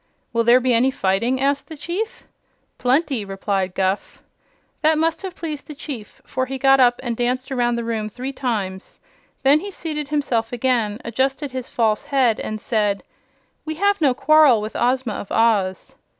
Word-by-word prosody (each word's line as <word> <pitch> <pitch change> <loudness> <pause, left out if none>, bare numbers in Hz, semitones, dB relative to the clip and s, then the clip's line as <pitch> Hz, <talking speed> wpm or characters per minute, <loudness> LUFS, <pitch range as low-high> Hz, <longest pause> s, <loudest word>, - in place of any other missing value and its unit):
"Will 230 0 +2
there 240 +2 +6
be 255 -1 +1
any 240 +3 +4
fighting?" 230 +3 0
asked 280 +1 0
the 315 - -8
Chief. 370 +9 -4 0.6
"Plenty," 265 -2 +1
replied 195 -1 -2
Guph. 190 +1 -2 0.6
That 315 0 +3
must 325 +1 0
have 380 -2 -6
pleased 305 -3 -6
the 300 - -8
Chief, 260 -7 -8
for 260 +2 -2
he 270 +1 -4
got 270 0 +5
up 245 -1 +4
and 240 -2 -2
danced 250 +3 -1
around 240 -2 +1
the 235 - -2
room 220 -2 -2
three 255 +5 -6
times. 205 -8 -4 0.4
Then 280 +3 +5
he 400 +5 -6
seated 310 -6 -4
himself 255 -6 -1
again, 240 -4 0
adjusted 265 +4 -1
his 255 -1 -5
false 220 -3 +1
head, 255 -5 +2
and 215 0 -4
said: 210 -3 0 0.6
"We 315 0 -4
have 405 +2 +1
no 270 -5 +3
quarrel 305 -6 +5
with 215 +1 -6
Ozma 250 -2 +1
of 200 - -7
Oz." 205 -5 +1
250 Hz, 175 wpm, -21 LUFS, 220-280 Hz, 0.6 s, there